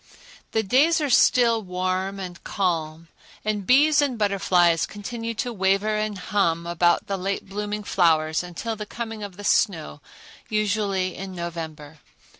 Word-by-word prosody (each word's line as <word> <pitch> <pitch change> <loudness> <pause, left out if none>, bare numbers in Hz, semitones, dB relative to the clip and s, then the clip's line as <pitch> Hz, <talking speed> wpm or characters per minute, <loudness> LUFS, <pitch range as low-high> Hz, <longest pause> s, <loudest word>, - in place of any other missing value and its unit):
The 220 - +2
days 285 - +3
are 295 -3 -1
still 235 -2 +4
warm 185 +1 -2
and 180 -2 -8
calm, 165 -4 -2 0.4
and 210 -3 -2
bees 295 +4 +5
and 270 -4 0
butterflies 180 -5 +2
continue 230 +2 -5
to 240 +2 -3
waver 195 +2 +1
and 215 -1 -2
hum 170 -4 0
about 175 0 +2
the 195 - -2
late 195 +2 -3
blooming 210 +1 -4
flowers 160 -5 +2
until 180 +6 -5
the 210 -1 -7
coming 225 -1 -6
of 200 -3 -7
the 205 - -9
snow, 165 - +1 0.5
usually 205 -3 0
in 190 0 -7
November. 160 -3 -7
195 Hz, 145 wpm, -24 LUFS, 175-215 Hz, 0.5 s, bees